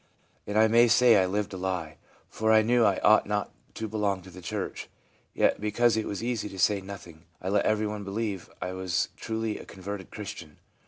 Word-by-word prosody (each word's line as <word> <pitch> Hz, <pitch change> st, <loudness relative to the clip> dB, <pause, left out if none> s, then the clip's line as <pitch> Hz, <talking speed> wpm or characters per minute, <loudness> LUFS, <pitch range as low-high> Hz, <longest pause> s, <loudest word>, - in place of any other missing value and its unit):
And 105 Hz, +1 st, -1 dB
I 110 Hz, 0 st, +6 dB
may 120 Hz, +2 st, +5 dB
say 120 Hz, -1 st, +6 dB
I 95 Hz, -1 st, +3 dB
lived 100 Hz, +2 st, -2 dB
a -, -, -5 dB
lie, 90 Hz, -4 st, -3 dB, 0.3 s
for 110 Hz, 0 st, 0 dB
I 110 Hz, 0 st, +6 dB
knew 120 Hz, +1 st, +3 dB
I 100 Hz, -3 st, +3 dB
ought 110 Hz, -1 st, +5 dB
not 105 Hz, 0 st, -2 dB, 0.2 s
to 110 Hz, -, -4 dB
belong 100 Hz, -3 st, -1 dB
to 95 Hz, -, -13 dB
the 90 Hz, +1 st, -11 dB
church; 85 Hz, -, -5 dB, 0.5 s
yet, -, -, +2 dB
because 110 Hz, +2 st, +2 dB
it 110 Hz, -, -1 dB
was 100 Hz, +2 st, -4 dB
easy 120 Hz, -3 st, -2 dB
to 95 Hz, -, -10 dB
say 100 Hz, +1 st, +2 dB
nothing, 90 Hz, -4 st, -11 dB
I 95 Hz, -, -4 dB
let 100 Hz, 0 st, +2 dB
everyone 105 Hz, -1 st, 0 dB
believe 100 Hz, -1 st, -3 dB
I 90 Hz, -, -4 dB
was 95 Hz, -1 st, -1 dB
a -, -, -27 dB
truly 110 Hz, -1 st, -2 dB
converted 95 Hz, 0 st, -7 dB
Christian. 100 Hz, -7 st, -8 dB
105 Hz, 205 wpm, -28 LUFS, 95-110 Hz, 0.5 s, I